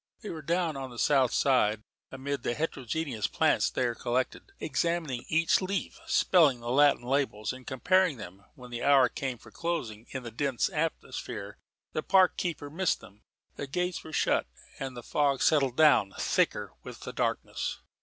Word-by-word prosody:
They 210 - -6
were 160 - -6
down 170 0 0
on 135 -1 -5
the 120 - -11
south 135 -2 +3
side, 110 -6 +2 0.3
amid 135 0 -4
the 120 - -1
heterogeneous 140 -5 -2
plants - - +2
there 120 -2 0
collected, 125 - -2
examining 165 -8 -1
each 165 +3 +3
leaf, 190 +1 -3
spelling 155 -9 +4
the 120 0 -4
Latin 145 -2 +4
labels 125 -4 -1
and 130 -1 -12
comparing 180 +3 +2
them, 95 -2 -10
when 125 -1 -12
the 120 0 -4
hour 135 -3 +5
came 130 -1 -4
for - - -16
closing. 120 -10 -4
In 130 -1 -5
the 120 - -7
dense 135 - 0
atmosphere 165 -1 -4 0.3
the 155 - -1
park 185 +3 +4
keeper 155 -5 -3
missed 185 +3 0
them. 105 +2 -16 0.4
The 140 - -4
gates 180 +5 -2
were 160 - -10
shut; - - +1 0.3
and 130 -2 -5
the 120 - -7
fog 140 0 +1
settled 135 -5 +3
down 145 -11 +5
thicker - - 0
with - - -10
the - - -7
darkness. - - -2
135 Hz, 170 wpm, -29 LUFS, 120-160 Hz, 0.4 s, hour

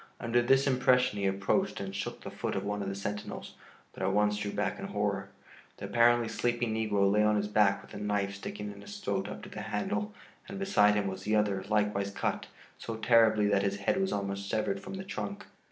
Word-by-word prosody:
Under 120 +1 +2
this 135 +3 +4
impression 125 -4 +3
he 100 - +1
approached 100 - 0
and 95 0 -5
shook 100 - -4
the - - -7
foot - - -3
of 95 - -1
one 105 0 -2
of 100 - -2
the 100 - -4
sentinels, 105 +1 -5 0.4
but - - -9
at 95 0 +1
once 105 +1 +2
drew 105 -1 -3
back - - -2
in - - -4
horror. - - -1 0.5
The - - -6
apparently 120 0 +4
sleeping 120 0 -1
negro 105 -3 +2
lay 105 +1 +3
on 105 0 +3
his 105 0 0
back 100 -2 +3
with - - -15
a - - -6
knife 105 -1 -1
sticking 105 +1 -6
in 100 0 -12
his 205 - -9
throat 100 - -2
up - - -8
to - - -9
the 105 - -7
handle 200 - -2 0.4
and 195 - -6
beside 105 - +4
him 105 -1 +1
was 95 -1 -4
the 110 +1 +2
other, 100 -3 +1
likewise 105 -2 +1
cut 100 - -2 0.3
so 115 - -5
terribly 110 -2 +4
that 100 -1 +3
his 100 0 0
head 185 - +1
was 190 - 0
almost 100 0 -3
severed 100 -2 0
from 190 - -8
the 190 - -5
trunk. 200 +1 -5
105 Hz, 225 wpm, -30 LUFS, 100-120 Hz, 0.5 s, this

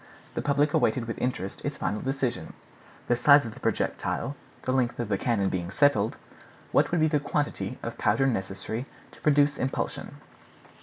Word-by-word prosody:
The - - -2
public 145 +1 +2
awaited 125 -4 +2
with 115 - -5
interest 100 -7 -3
its - - -3
final 105 - -2
decision. 130 - -2 0.5
The 120 - +3
size 140 +3 +6
of 115 - -6
the - - -13
projectile, 140 - -1 0.3
the 130 - 0
length 125 -2 +1
of 120 -3 -2
the 100 - +1
cannon 100 -5 +1
being 90 -1 -3
settled, 120 -2 +3 0.6
what - - +4
would 175 - +1
be 155 - +5
the 150 -1 +2
quantity 145 0 -2
of - - -5
powder 110 +6 +3
necessary 110 +2 -2 0.2
to - - -18
produce 145 -1 +3
impulsion? 130 - -3
125 Hz, 170 wpm, -27 LUFS, 105-145 Hz, 0.6 s, size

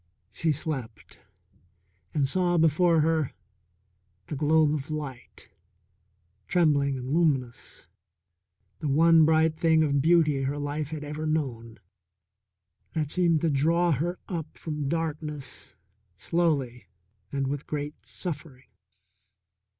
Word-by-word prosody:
She 160 +8 0
slept, 125 -8 -5 0.9
and 140 -3 +1
saw 175 +3 +1
before 165 +1 +4
her 160 -2 +1 0.9
the - - -5
globe 150 +1 +3
of 145 -1 -4
light, 145 -6 -7 1.0
trembling 145 -6 +2
and 130 +2 -4
luminous, 140 -8 -1 0.9
the 155 - -3
one 160 +3 +5
bright 160 0 +3
thing 160 -1 +4
of 140 -2 +1
beauty 155 -3 +3
her 135 +2 -2
life 145 0 -3
had 155 -1 -5
ever 150 +1 -4
known, 120 -8 -2 1.2
that 155 -3 -2
seemed 170 -4 +2
to 165 - +1
draw 165 +5 +2
her 170 +6 -1
up 165 -5 -5
from 150 -3 -4
darkness 150 -4 -4 0.4
slowly 135 - -1 0.4
and 140 -1 -1
with 140 +1 -4
great 150 0 -5
suffering. 145 -6 -7
150 Hz, 110 wpm, -27 LUFS, 140-160 Hz, 1.2 s, one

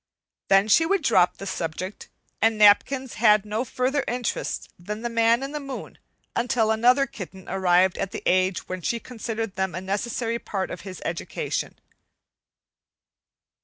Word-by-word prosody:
Then 195 +1 +5
she 220 +10 +5
would 360 +1 +1
drop 180 -9 +3
the 195 - -7
subject, 185 +1 -5 0.3
and 225 -1 +3
napkins 235 +5 +4
had 210 -2 +5
no 215 +3 -2
further 260 +2 -1
interest 245 -1 -2
than 210 +5 -6
the 240 - -2
man 230 +2 +3
in 275 - -4
the 300 - -4
moon 275 -2 -8 0.4
until 235 -2 +1
another 245 +5 +4
kitten 190 -6 -10
arrived 185 -1 +2
at 195 - -1
the - - -7
age 185 +1 +1
when 185 0 -5
she 235 +7 -1
considered 225 -4 -5
them 190 -2 -1
a - - -2
necessary 230 +4 -2
part 195 -4 -4
of 180 - -6
his 185 -1 -9
education. 165 0 -3
215 Hz, 155 wpm, -25 LUFS, 190-240 Hz, 0.4 s, Then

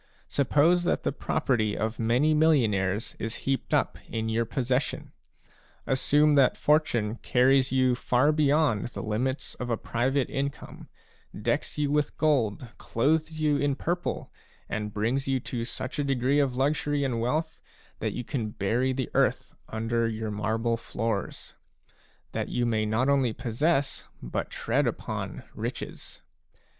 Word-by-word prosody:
Suppose 150 +5 +3
that - - +1
the - - +1
property 125 -7 0
of 110 +1 -2
many 120 +7 +3
millionaires 110 -11 +2
is 115 +1 -3
heaped 135 -1 -1
up - - +1
in 110 0 -2
your 115 +1 +1
possession. 130 +2 -1 0.7
Assume 145 +3 +3
that 140 -3 +4
fortune 120 -8 +2
carries 130 +2 +3
you 130 -1 +3
far 125 +4 +2
beyond 150 -6 +2
the 120 - -7
limits 125 +6 -2
of 125 - -4
a 115 - +1
private 130 +4 0
income, 140 +1 -5 0.5
decks - - -1
you 145 -1 0
with 150 -1 0
gold, 125 -6 +1
clothes 155 +6 0
you 150 -2 +3
in 145 -1 +1
purple, 175 +5 -3 0.3
and 105 -1 -3
brings 120 +7 -1
you 135 -1 +1
to 115 -1 -4
such 130 +4 -5
a - - +2
degree 135 +1 +2
of 135 -3 +1
luxury 145 +2 +1
and 120 -4 -1
wealth 155 +7 -1 0.4
that - - -2
you 125 - -4
can 115 -3 -3
bury 115 +6 0
the 130 -1 -3
earth - - +1 0.2
under 115 +1 0
your 110 -1 -3
marble 110 +3 0
floors; 115 -3 -4 0.8
that - - -3
you 120 - 0
may 110 -2 +1
not 110 +5 +1
only 135 -5 +2
possess, 135 +5 0
but - - -4
tread - - 0
upon, - - -4
riches. - - -6
130 Hz, 145 wpm, -27 LUFS, 115-145 Hz, 0.8 s, that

